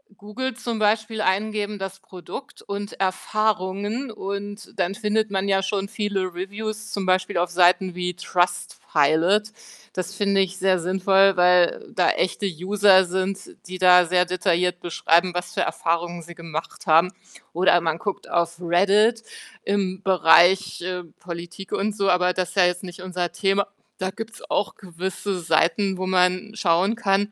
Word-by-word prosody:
Google 225 +6 -5
zum 230 -2 -4
Beispiel 215 +1 +1
eingeben: 210 +1 -1
„das 195 0 -6
Produkt 185 - -10
und 200 0 -6
Erfahrungen“, 205 +4 -1
und 205 +1 -6
dann 195 +3 0
findet 215 -1 0
man 195 0 -1
ja 195 0 +3
schon 200 0 -2
viele 195 -4 -2
Reviews, 215 +4 -5
zum 200 -2 -3
Beispiel 185 +1 +1
auf 175 0 +1
Seiten 180 +1 +3
wie 180 0 -2
Trustpilot. 175 +2 +1 0.4
Das 185 +2 -5
finde 200 -1 +1
ich 190 -1 0
sehr 190 -1 +2
sinnvoll, 190 +2 +3
weil 180 -1 +3
da 180 - +3
echte 185 +3 -1
User 190 +2 +4
sind, 190 +2 -2 0.3
die 185 0 -6
da 180 -1 +6
sehr 180 +1 +3
detailliert 180 0 0
beschreiben, 175 +1 +1
was 180 0 -4
für - - -1
Erfahrungen 170 +1 -2
sie 170 +1 -12
gemacht 165 -1 -7
haben. 165 +4 +5 0.4
Oder 175 0 +3
man 160 -1 -1
guckt 200 +2 -5
auf 170 -1 0
Reddit 200 +6 +3 0.4
im 195 -1 -1
Bereich, 180 +1 +4
äh, 180 0 -4 0.2
Politik 175 +2 -8
und 205 +1 -1
so, 195 -2 0
aber 180 0 +3
das 180 -1 -2
ist - - -12
ja 180 -2 +5
jetzt 180 +1 -1
nicht 180 0 -9
unser 180 -2 -3
Thema. 195 0 +1 0.3
Da 185 0 -1
gibt's 225 +3 -9
auch - - -1
gewisse 190 +1 -5
Seiten, 175 +4 +1
wo 185 - -3
man 185 +2 +1
schauen 190 +3 +2
kann. 205 -2 0
185 Hz, 155 wpm, -23 LUFS, 180-205 Hz, 0.4 s, da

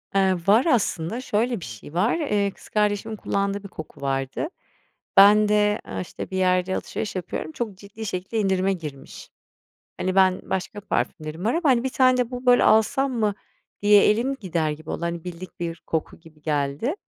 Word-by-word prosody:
Eee, 190 -1 +4
var 220 +6 +5
aslında. 225 - 0
Şöyle 235 -1 0
bir - - -8
şey 115 +5 -10
var, 205 - +2
eee, 210 -11 0
kız - - -17
kardeşimin 210 +1 0
kullandığı 200 -1 -2
bir - - -7
koku 160 -5 -10
vardı. 135 - -2 0.7
Ben 210 +2 +7
de, 210 0 +2
aaa, 95 -1 -5
işte, 90 - -7
bir 190 - -2
yerde 185 0 +2
alışveriş 210 - -4
yapıyorum, 175 -3 -4
çok 210 +1 -5
ciddi 205 +3 -9
şekilde 190 +3 -3
indirime 195 -1 +1
girmiş. 150 -6 -9 0.7
Hani, 185 0 -1
ben 190 -1 +4
başka 190 +3 -3
parfümlerim 160 -4 -3
var 225 - +2
ama, 330 -2 +1
hani, 245 0 +2
"1 - - +1
tane 255 -1 +4
de 250 -1 0
bu, 250 0 -6
böyle, 245 0 +6
alsam 260 +5 +3
mı?" 215 -4 0 0.5
diye 205 0 +6
elim 245 +6 +1
gider 170 -9 -1
gibi 155 +1 -7
oldu, - - -4
hani, 170 0 -3
bildik 180 0 -9
bir 165 -1 -4
koku 160 -1 -3
gibi 160 -2 -19
geldi. 150 - -1
195 Hz, 185 wpm, -24 LUFS, 170-220 Hz, 0.7 s, Ben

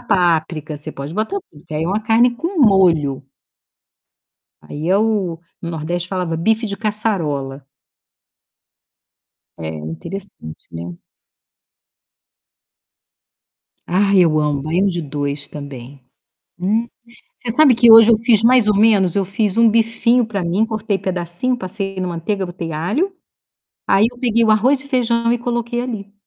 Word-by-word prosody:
páprica, 170 -7 0
você 150 +2 -8
pode 140 +3 -7
botar 220 - -2
tudo, 150 - -20
que 155 - -6
aí 155 - -1
é - - -2
uma 200 +3 0
carne 235 +2 +3
com 340 +7 -4
molho. 175 - +3 1.4
Aí, 155 +3 -6
é 190 - +4
o 205 -6 0 0.2
no 170 - -4
Nordeste 170 +2 -4
falava 180 -4 -2
bife 220 +7 0
de 200 -1 -5
caçarola. 165 -12 -2 1.9
É 80 - -5
interessante, 80 - -8 0.2
né? 85 +1 -7 2.9
Ah, 195 +3 +1
eu 170 -5 +4
amo 145 -2 -1
baião-de-dois 150 -5 -2
também. 140 -2 -10 0.6
Hum. 210 +6 0 0.5
Você 240 - -4
sabe 270 0 +5
que 235 0 +6
hoje 225 0 +9
eu 225 - +5
fiz 225 -1 +2
mais 245 -2 +5
ou 210 - +3
menos. 200 -4 +3
Eu 200 -1 +1
fiz 200 +2 -1
um 230 0 +6
bifinho 230 +2 +2
pra 205 -4 -3
mim, 180 +6 +1
cortei 215 -2 -2
pedacinho, 180 +7 -2
passei 195 -1 -5
na 185 - -2
manteiga, 180 +3 -3
botei 175 -2 -6
alho, 215 - -1 0.7
aí 205 +3 +4
eu 245 - -17
peguei 235 -2 +1
o 220 - +3
arroz 255 +6 +3
e 280 - -12
feijão 235 -3 +1
e 240 - 0
coloquei 240 0 -2
ali. 210 -5 -6
195 Hz, 140 wpm, -18 LUFS, 165-225 Hz, 2.9 s, hoje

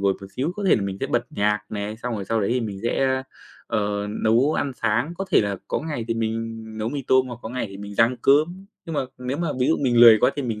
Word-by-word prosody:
ngồi 100 -1 +3
một 100 - -8
xíu, 145 +7 -1
có 205 - -4
thể - - +6
là 105 - -2
mình 95 -1 -3
sẽ 135 - -1
bật 120 -3 0
nhạc 105 -7 +1
này. 105 +1 -4
Xong 120 +1 -4
rồi 100 -3 -4
sau 115 +2 0
đấy 100 - 0
thì 125 - +1
mình 100 -4 -5
sẽ 120 +3 +1
a, 130 0 0 0.4
ờ, 105 -1 -1 0.2
nấu 120 +7 +4
ăn 140 - -1
sáng, 120 +8 +1
có 195 - -1
thể - - +5
là 100 -2 -1
có - - 0
ngày 150 -7 -4
thì 115 - 0
mình 115 0 -3 0.2
nấu 110 - -1
mì 140 +1 -4
tôm 130 0 +4
hoặc 120 -2 -7
có - - -5
ngày 125 0 -3
thì 100 - -9
mình 100 +1 -8
rang 115 +4 +3
cơm. 155 +7 +3 0.2
Nhưng 165 - -6
mà - - +1 0.2
nếu 125 +2 -3
mà 170 +1 -1
ví 125 - +3
dụ 160 - +3
mình 125 -4 +1
lười 115 -2 +9
quá 125 - +4
thì 145 - -2
mình 115 -4 -3
115 Hz, 290 wpm, -23 LUFS, 105-135 Hz, 0.4 s, lười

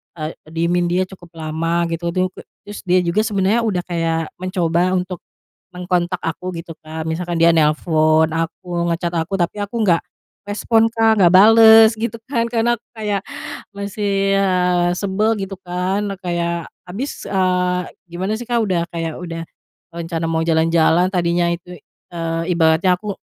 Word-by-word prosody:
eee, 155 -1 -4 0.2
diemin 170 +2 0
dia 180 +2 +1
cukup 180 -2 -13
lama, 165 +2 -1
gitu 165 +1 -3
tuh, 185 0 +1 0.3
terus 205 0 -8
dia 180 0 +3
juga 170 +4 0
sebenarnya 205 +1 +1
udah 180 -4 -1
kayak 165 -2 -2
mencoba 180 -1 0
untuk 180 0 -3 0.5
mengontak 180 0 -1
aku 165 +3 -3
gitu 165 0 -8
Kak, 155 0 -6
misalkan 170 +1 -3
dia 170 0 +6
nelpon 155 0 +3
aku, 170 +1 -3
nge-chat 170 +1 -2
aku, 165 +4 -1
tapi 175 +4 -1
aku 205 +3 -7
nggak 170 -4 +3 0.5
respon 225 +2 +2
Kak, 225 -1 +3
nggak 175 - +7
bales, 220 +3 +8
gitu 230 +1 -3
kan. 235 -4 0
Karena 240 0 +2
aku 240 - -61
kayak, 210 -3 -2 0.5
masih, 200 -1 -1
eee, 180 -2 +2
sebel, 210 +3 0
gitu 195 0 -5
kan, 185 +3 -2 0.2
kayak 170 -1 -2 0.2
habis, 225 +11 -5
ah, 180 -1 +1 0.2
gimana 185 +5 -2
sih 240 - -7
Kak, 240 -1 +1
udah 180 -5 0
kayak 165 -2 -4
udah 165 -2 -6 0.5
rencana 165 -1 -4
mau 160 0 0
jalan-jalan, 165 +1 +3
tadinya 175 -1 +1
itu, 175 +1 -9 0.4
eee, 165 -1 -2
ibaratnya 165 +2 +3
aku, 210 0 -4
180 Hz, 150 wpm, -19 LUFS, 165-195 Hz, 0.5 s, bales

